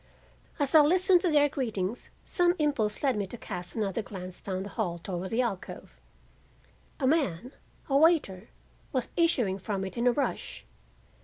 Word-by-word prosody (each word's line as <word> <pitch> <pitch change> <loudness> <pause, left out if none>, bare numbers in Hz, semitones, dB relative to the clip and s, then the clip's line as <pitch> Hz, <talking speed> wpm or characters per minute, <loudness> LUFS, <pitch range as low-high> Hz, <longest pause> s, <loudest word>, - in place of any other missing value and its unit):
As 285 -3 0
I 315 - +9
listened 360 +3 +4
to 360 - +1
their 295 -2 +4
greetings 230 -7 -3
some 350 -1 +2
impulse 280 -9 0
led 270 -3 +2
me 205 -2 -2
to 240 - -9
cast 180 -5 -5
another 215 -1 -1
glance 185 -3 -8
down 190 -1 -4
the 200 - -7
hall 190 -6 -2
toward 180 +1 -5
the 240 +3 +1
alcove. 200 -6 -5 1.1
A 270 - 0
man—a 265 - -2
waiter—was 260 - 0
issuing 245 - +1
from 195 -1 -3
it 190 - -7
in 235 +1 +1
a - - +6
rush. 280 +3 -3
235 Hz, 155 wpm, -28 LUFS, 190-290 Hz, 1.1 s, I